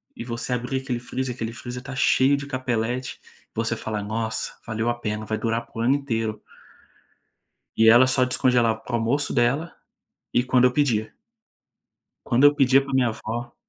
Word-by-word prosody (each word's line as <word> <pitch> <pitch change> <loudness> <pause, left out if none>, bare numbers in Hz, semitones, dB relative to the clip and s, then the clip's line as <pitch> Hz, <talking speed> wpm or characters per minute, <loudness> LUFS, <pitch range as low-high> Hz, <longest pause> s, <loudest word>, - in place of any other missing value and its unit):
e - - -6
você 120 +1 -4
abrir 125 +2 -2
aquele 125 -3 -3
freezer, 125 +1 -4
aquele 115 -2 -4
freezer 120 +1 -7
tá 135 +1 -7
cheio 135 +2 +3
de 140 - -6
capeleti, 125 -2 -3
e - - -25
você 115 +1 -1
falar: 110 -2 -4
"Nossa, 110 +1 -3
valeu 110 0 -2
a - - +2
pena, 105 -1 -3
vai 110 0 -2
durar 115 +1 -2
para 115 - -10
o - - 0
ano 130 +4 +3
inteiro". 115 -6 -3 1.4
E 110 0 +6
ela 120 +3 +7
só 130 0 +2
descongelava 125 -3 +2
para 115 +2 -9
o - - +3
almoço 130 +6 0
dela, 135 +8 +1 0.6
e 120 - +3
quando 125 -1 +3
eu 125 - +4
pedia. 115 -7 0 1.2
Quando 125 +4 +4
eu 145 0 +6
pedia 135 -1 +4
para 140 - -8
minha 130 -3 +2
avó 120 +2 -6
120 Hz, 185 wpm, -24 LUFS, 115-130 Hz, 1.4 s, ela